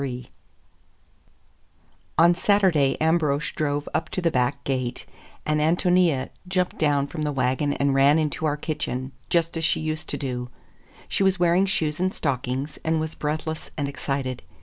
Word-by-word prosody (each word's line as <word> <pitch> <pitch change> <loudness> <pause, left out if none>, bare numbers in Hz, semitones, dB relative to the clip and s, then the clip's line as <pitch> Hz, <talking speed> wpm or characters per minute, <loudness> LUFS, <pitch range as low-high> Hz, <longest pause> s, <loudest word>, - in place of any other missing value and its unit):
III 125 -3 -5 1.9
ON 170 +2 +6
Saturday 180 -7 +3
Ambrosch 155 -3 +1
drove 145 -1 -1
up 160 -1 -1
to - - -3
the 170 -2 +1
back 125 +2 0
gate, 130 -2 -2 0.4
and 150 0 +1
Ántonia 170 -3 +2 0.2
jumped 180 -1 -1
down 145 -3 +2
from 155 +2 -6
the 150 -1 0
wagon 135 +2 0
and 140 0 +1
ran 140 +3 +5
into 155 0 0
our 145 0 0
kitchen 145 -4 -3 0.2
just 170 -1 +1
as 165 - -2
she 160 - +2
used 155 0 -3
to - - -1
do. 125 -3 -4 0.6
She - - -2
was 190 -1 +3
wearing 175 +2 +4
shoes 155 -5 -1
and 185 +1 +1
stockings, 135 -1 -2
and 160 0 +1
was 160 0 -3
breathless 155 +1 -3
and 145 -2 -1
excited. 135 -2 -3
150 Hz, 160 wpm, -24 LUFS, 140-165 Hz, 1.9 s, ON